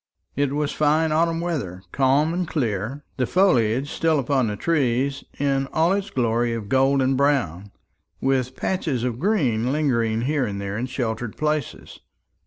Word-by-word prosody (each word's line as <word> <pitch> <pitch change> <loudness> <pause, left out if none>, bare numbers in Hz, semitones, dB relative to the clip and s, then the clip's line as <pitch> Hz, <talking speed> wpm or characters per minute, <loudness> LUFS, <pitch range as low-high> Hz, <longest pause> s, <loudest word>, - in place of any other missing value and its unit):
It 140 0 0
was 150 0 -1
fine 155 +1 +2
autumn 165 +1 +1
weather, 125 - -3
calm 140 +4 +2
and 180 0 -1
clear, 125 - -2
the 125 -2 0
foliage 135 - +2
still 160 -1 +1
upon 135 -2 +1
the 105 - -2
trees, 135 -2 0
in 135 -1 0
all 165 +4 +3
its 200 0 -2
glory 120 -3 0
of 105 -3 -6
gold 135 +1 +3
and 130 +1 +2
brown, 120 - 0 0.5
with 130 -1 0
patches 155 -10 -1
of 125 -2 -2
green 130 - +1
lingering 115 -7 +1
here 140 0 0
and 100 -1 -4
there 100 0 -4
in 120 +4 -2
sheltered 120 -3 -3
places. 150 -1 -3
135 Hz, 160 wpm, -23 LUFS, 115-155 Hz, 0.5 s, all